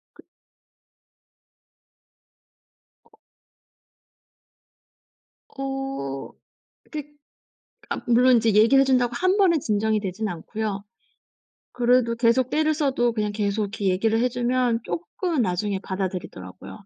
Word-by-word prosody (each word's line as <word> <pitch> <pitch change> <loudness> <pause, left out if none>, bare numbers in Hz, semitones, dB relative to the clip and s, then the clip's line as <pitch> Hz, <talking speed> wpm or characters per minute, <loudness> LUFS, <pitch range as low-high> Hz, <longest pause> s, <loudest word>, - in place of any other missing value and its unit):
그 - - -17 2.9
어. 440 - -25 2.3
어 270 - -5 0.6
그 300 -2 -4 0.9
아 - - -3
물론 250 +1 +5
이제 225 -1 +2
얘기를 225 +6 +5
해 275 - +5
준다고 245 -2 +2
1 370 +8 +2
번에 370 -5 +4
진정이 215 -2 0
되진 200 +2 -3
않고요. 200 +3 -4 0.9
그래도 245 -1 +2
계속 240 +2 +2
떼를 310 0 +2
써도 265 -5 +1
그냥 210 -2 -1
계속 205 0 -1
이렇게 205 0 -5
얘기를 215 +4 +2
해 250 +2 +2
주면 245 -1 0
쪼끔 340 -1 -2
나중에 195 0 -1
받아들이더라고요. 185 - -6
230 Hz, 215 characters per minute, -24 LUFS, 205-265 Hz, 2.9 s, 물론